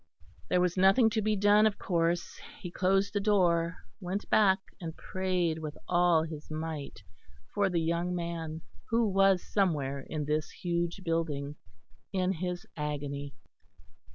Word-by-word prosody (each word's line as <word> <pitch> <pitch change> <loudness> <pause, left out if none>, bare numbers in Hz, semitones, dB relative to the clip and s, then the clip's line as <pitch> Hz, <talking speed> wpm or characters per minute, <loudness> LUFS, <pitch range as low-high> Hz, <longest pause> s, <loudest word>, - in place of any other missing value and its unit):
There 180 - +3
was 180 0 +1
nothing 195 +5 +5
to 220 0 0
be 215 0 +1
done 205 +2 +5
of 210 - -2
course; 170 -1 -1 0.2
he 175 - -7
closed 195 +2 +1
the 205 - +1
door, 180 -5 +2 0.2
went 185 +3 -4
back 195 -3 +5 0.2
and 165 -2 -6
prayed 180 -4 -1
with 155 -2 -6
all 175 -2 +4
his 155 -2 -8
might 155 -2 -5 0.5
for 205 -1 +2
the 175 -2 +1
young 170 +2 0
man 165 -2 -4 0.3
who 230 0 +3
was 195 -2 +3
somewhere 150 -9 0
in 150 +2 -4
this 150 +1 -1
huge 175 +1 -2
building, 150 -4 -2 0.6
in 185 -1 +1
his 180 0 -4
agony. 145 -2 -4
175 Hz, 145 wpm, -30 LUFS, 160-195 Hz, 0.6 s, nothing